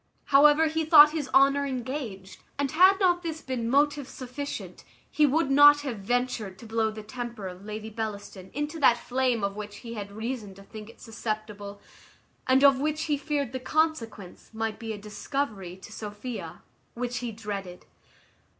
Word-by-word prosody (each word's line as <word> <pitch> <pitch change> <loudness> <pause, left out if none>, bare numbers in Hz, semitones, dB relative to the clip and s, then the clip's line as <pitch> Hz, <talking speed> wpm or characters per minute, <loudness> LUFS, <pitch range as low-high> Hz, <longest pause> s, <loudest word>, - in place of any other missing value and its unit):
However, 295 +3 +7
he 320 +1 0
thought 300 -1 +8
his 300 -4 -3
honour 275 +1 +5
engaged, 250 -7 -5 0.2
and 280 -1 -1
had 375 +5 +6
not 355 -3 +3
this 325 -2 -4
been 250 -6 -3
motive 285 +1 +2
sufficient, 275 +3 -7 0.3
he 300 -1 +4
would 290 0 +1
not 290 +1 +7
have 255 -7 -5
ventured 230 -2 -2
to 230 - -12
blow 220 0 0
the 215 0 -8
temper 235 -2 -6
of 180 +1 -9
Lady 215 +1 -6
Bellaston 205 -3 -6
into 295 +3 -4
that 240 -5 +5
flame 250 -2 0
of 200 0 -1
which 210 -1 -7
he 230 - -6
had 205 -3 -6
reason 220 -2 -5
to 195 - -14
think 215 +1 -10
it - - -16
susceptible, 215 -3 -5 0.7
and 260 +1 +4
of 275 -2 +6
which 305 +2 -1
he 300 - 0
feared 285 -3 -2
the 260 - -4
consequence 250 - -2
might 220 -1 -3
be 225 -1 -5
a 215 - -5
discovery 210 -3 -4
to 195 - -13
Sophia, 215 +3 -7 0.3
which 245 0 -3
he 240 -2 -4
dreaded. 200 -4 -7
245 Hz, 170 wpm, -27 LUFS, 210-285 Hz, 0.7 s, thought